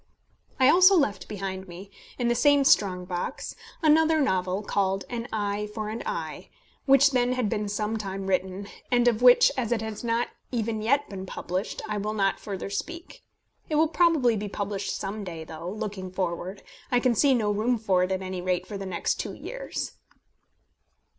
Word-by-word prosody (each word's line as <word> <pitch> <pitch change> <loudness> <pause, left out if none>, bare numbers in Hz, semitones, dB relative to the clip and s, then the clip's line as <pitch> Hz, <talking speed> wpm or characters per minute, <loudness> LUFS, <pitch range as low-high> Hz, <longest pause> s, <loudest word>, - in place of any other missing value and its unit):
I 260 - +6
also 370 +6 +7
left 250 -11 0
behind 190 -2 -5
me, 185 +3 -10 0.3
in 245 - 0
the 240 - +3
same 285 +4 +4
strong 185 -8 +3
box, 180 -1 -4 0.3
another 315 +1 +5
novel, 190 -6 0
called 195 -1 0
An 240 0 -4
Eye 210 -1 -2
for 215 -1 -3
an 225 +2 -4
Eye, - - -5 0.4
which 275 +1 +6
then 250 -1 +2
had 250 -4 0
been 210 0 -2
some 210 +2 -1
time 195 -2 -5
written, 190 +1 -1 0.2
and 245 0 +3
of 235 -1 +2
which, 250 0 +7
as 245 -3 -2
it 225 -2 0
has 220 0 -6
not 235 0 0 0.2
even 225 -3 -1
yet 280 +6 +2
been 190 -1 -7
published, 185 +2 -4
I 210 -1 -2
will 210 +2 -3
not 195 -2 +1
further 200 -1 -5
speak. 335 - -6 0.5
It 310 - 0
will 310 +1 +4
probably 320 -9 +3
be 205 0 -4
published 200 0 -3
some 205 +2 -4
day, 165 -4 -6
though, 160 +2 -7
looking 200 -3 -5
forward, 185 +1 -3 0.3
I 245 - +4
can 250 -1 +2
see 270 +3 +4
no 215 -3 +1
room 225 +4 +1
for 195 -5 +1
it, 185 +1 0
at 190 0 -1
any 185 -1 -4
rate, 180 0 -1
for 200 0 -6
the 195 - -5
next 180 -2 -1
two - - -3
years. - - -5
210 Hz, 185 wpm, -26 LUFS, 190-245 Hz, 0.5 s, also